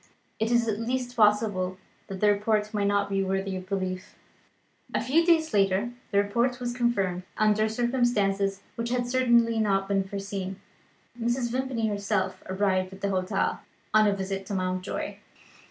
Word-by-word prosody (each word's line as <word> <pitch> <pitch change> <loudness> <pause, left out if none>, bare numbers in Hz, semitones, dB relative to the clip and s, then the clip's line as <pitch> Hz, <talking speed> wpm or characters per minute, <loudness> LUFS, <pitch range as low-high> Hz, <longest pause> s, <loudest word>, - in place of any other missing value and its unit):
It 220 +1 +1
is 235 -1 +3
at 215 -1 -1
least 245 +1 -2
possible 210 -4 +2 0.3
that 190 -1 -7
the 210 -1 +5
report 210 +1 0
may 205 -1 0
not 200 0 +2
be 195 -1 0
worthy 195 0 -1
of 185 0 -7
belief." 185 -2 -3 0.8
A - - +3
few 285 +8 +3
days 325 -2 +3
later 200 +3 +2 0.2
the 200 - 0
report 235 +5 +1
was 245 -1 -3
confirmed, 200 -7 0 0.2
under 215 0 +3
circumstances 215 -5 +1
which 230 0 -3
had 245 0 0
certainly 235 -2 +3
not 195 -2 +1
been 195 -1 +1
foreseen. 195 -1 -5 0.6
Mr. 240 +1 0
Vimpany 255 -2 -1
himself 200 -2 -1
arrived 190 -1 +1
at 190 - -12
the 200 - 0
hotel, 185 -1 0 0.3
on 215 0 +6
a 200 - +2
visit 195 0 -3
to 200 - -3
Mountjoy. 185 0 -3
205 Hz, 160 wpm, -27 LUFS, 195-235 Hz, 0.8 s, on